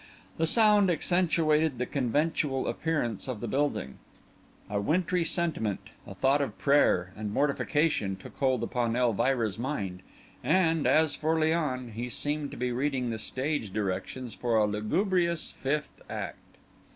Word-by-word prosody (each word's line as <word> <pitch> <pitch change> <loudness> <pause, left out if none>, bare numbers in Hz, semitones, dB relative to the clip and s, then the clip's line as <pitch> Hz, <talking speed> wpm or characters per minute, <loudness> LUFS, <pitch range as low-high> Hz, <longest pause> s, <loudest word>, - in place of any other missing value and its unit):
The 160 - +2
sound 210 -1 +5
accentuated 160 -4 +2
the 125 - -1
conventual 140 +1 0
appearance 150 -11 -2
of 125 -5 -4
the 120 - -4
building; 135 - -1 0.7
a 100 -1 -1
wintry 175 - +1
sentiment, 160 - -2 0.2
a - - -8
thought 135 +2 +3
of 140 - -3
prayer 95 -11 +3
and 105 -1 -4
mortification, 145 -5 +1
took 95 - -12
hold 130 -3 +1
upon 120 -2 -1
Elvira's 120 -2 +1
mind; 100 -9 -3 0.4
and, 165 +2 +2
as 155 -1 +4
for 160 +1 0
Léon, 155 -6 0
he 120 +3 -5
seemed 145 +3 -2
to - - -9
be 125 0 -1
reading 130 -1 -1
the 110 - -4
stage 130 -2 -2
directions 105 +5 -3
for 120 -2 -1
a 105 - +4
lugubrious 170 - 0
fifth 150 +3 -3
act. - - -5
135 Hz, 140 wpm, -29 LUFS, 115-160 Hz, 0.7 s, sound